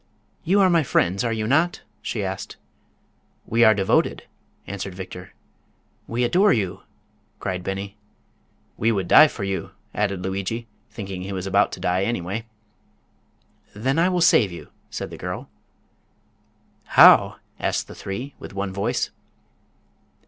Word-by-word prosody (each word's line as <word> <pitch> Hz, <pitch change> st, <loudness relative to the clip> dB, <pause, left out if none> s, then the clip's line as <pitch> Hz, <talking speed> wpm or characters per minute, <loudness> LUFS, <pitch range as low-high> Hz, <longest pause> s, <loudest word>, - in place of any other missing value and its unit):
"You 195 Hz, +4 st, +3 dB
are 190 Hz, -, +5 dB
my 170 Hz, -1 st, +4 dB
friends, 100 Hz, -, +1 dB
are 115 Hz, -, 0 dB
you 110 Hz, -1 st, -2 dB
not?" 160 Hz, +9 st, +1 dB, 0.2 s
she 105 Hz, -, -3 dB
asked. 95 Hz, +1 st, -5 dB, 0.9 s
"We 115 Hz, +1 st, +2 dB
are 110 Hz, -1 st, +6 dB
devoted!" 95 Hz, -1 st, +1 dB, 0.4 s
answered 95 Hz, -1 st, -6 dB
Victor. 90 Hz, -1 st, -9 dB, 0.7 s
"We 120 Hz, +2 st, -1 dB
adore 185 Hz, +12 st, +4 dB
you!" 95 Hz, -6 st, -1 dB, 0.6 s
cried 90 Hz, -1 st, -3 dB
Beni. 100 Hz, +2 st, -5 dB, 0.8 s
"We 115 Hz, +2 st, +2 dB
would 95 Hz, -5 st, -1 dB
die 155 Hz, -, +8 dB
for 105 Hz, -, -7 dB
you!" 95 Hz, 0 st, -3 dB, 0.2 s
added 100 Hz, -3 st, -1 dB
Lugui, 100 Hz, +5 st, -3 dB, 0.2 s
thinking 95 Hz, -3 st, -6 dB
he 95 Hz, +2 st, -6 dB
was 95 Hz, -1 st, -4 dB
about 100 Hz, +1 st, +2 dB
to -, -, -6 dB
die 90 Hz, +1 st, 0 dB
anyway. 110 Hz, +1 st, -3 dB, 1.3 s
"Then 130 Hz, +8 st, 0 dB
I 175 Hz, +2 st, +4 dB
will 180 Hz, -1 st, 0 dB
save 115 Hz, -, +5 dB
you," 85 Hz, -, -10 dB, 0.2 s
said -, -, -6 dB
the -, -, -8 dB
girl. -, -, -5 dB, 1.5 s
"How?" -, -, +8 dB, 0.2 s
asked -, -, -1 dB
the -, -, -10 dB
three, 120 Hz, +9 st, -6 dB
with -, -, -10 dB
one 100 Hz, -1 st, -3 dB
voice. 100 Hz, +1 st, -1 dB
100 Hz, 140 wpm, -23 LUFS, 95-120 Hz, 1.5 s, die